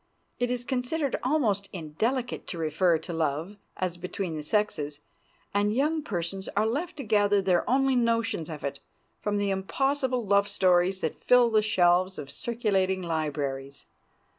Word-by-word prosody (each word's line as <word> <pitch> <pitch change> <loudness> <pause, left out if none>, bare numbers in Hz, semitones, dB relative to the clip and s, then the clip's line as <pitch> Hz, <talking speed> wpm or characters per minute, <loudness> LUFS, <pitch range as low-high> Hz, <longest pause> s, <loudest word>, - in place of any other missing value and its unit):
It 245 0 +1
is 245 -1 -2
considered 265 +3 -1
almost 225 -8 +1
indelicate 220 - -2
to 175 - -5
refer 165 +2 +2
to 160 +2 -7
love 160 +5 -2 0.2
as 180 -2 -2
between 180 -1 -4
the 155 - -4
sexes, 150 -5 -1 0.5
and 205 +1 +1
young 305 +4 +1
persons 190 - -4
are 210 - +4
left 305 +10 -2
to 280 - -4
gather 205 -2 +3
their 185 0 +1
only 270 +1 +3
notions 230 -8 +1
of 155 -2 -7
it 140 - -3 0.4
from 205 0 -1
the 200 -1 0
impossible 255 +5 0
love 200 0 +3
stories 185 0 +2
that 160 - -3
fill 245 -2 +5
the 215 -1 +4
shelves 185 -2 +3
of 140 -1 -7
circulating 190 -2 0
libraries. 140 -4 -3
200 Hz, 155 wpm, -27 LUFS, 170-240 Hz, 0.5 s, fill